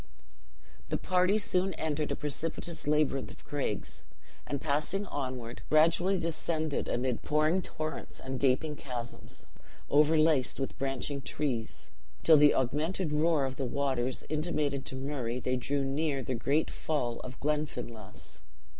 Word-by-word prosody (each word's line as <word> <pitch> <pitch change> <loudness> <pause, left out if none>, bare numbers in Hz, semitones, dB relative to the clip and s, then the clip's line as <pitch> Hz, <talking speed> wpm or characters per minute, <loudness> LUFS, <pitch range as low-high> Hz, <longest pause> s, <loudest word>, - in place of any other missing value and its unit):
The - - +1
party 185 +2 +3
soon 185 -3 +1
entered 155 -1 -1
a - - +1
precipitous 160 +2 -4
labyrinth 150 -2 +2
of - - -13
craigs; 140 -8 -3 0.4
and, 140 - -1
passing 155 +7 0
onward, 130 -7 -4
gradually 170 +5 +4
descended 160 -2 -1
amid 125 -1 0
pouring 155 +4 +2
torrents, 155 -3 -5
and 130 -1 -4
gaping 140 +3 +2
chasms 125 -4 -6 0.5
overlaced 150 -2 +4
with 135 - -3
branching 135 +1 -1
trees, 125 -4 -2 0.3
till 160 -2 +8
the 150 0 +7
augmented 155 +7 0
roar 150 -1 +3
of 130 +1 -4
waters 130 -1 0
intimated 150 -3 0
to - - -4
Murray, 130 -3 -2
they 130 0 0
drew 140 +3 0
near 140 0 0
the 130 - -2
great 140 +6 +1
fall 125 -7 -1
of 125 0 -8
Glenfinlass. 145 -8 -3
145 Hz, 130 wpm, -31 LUFS, 130-155 Hz, 0.5 s, till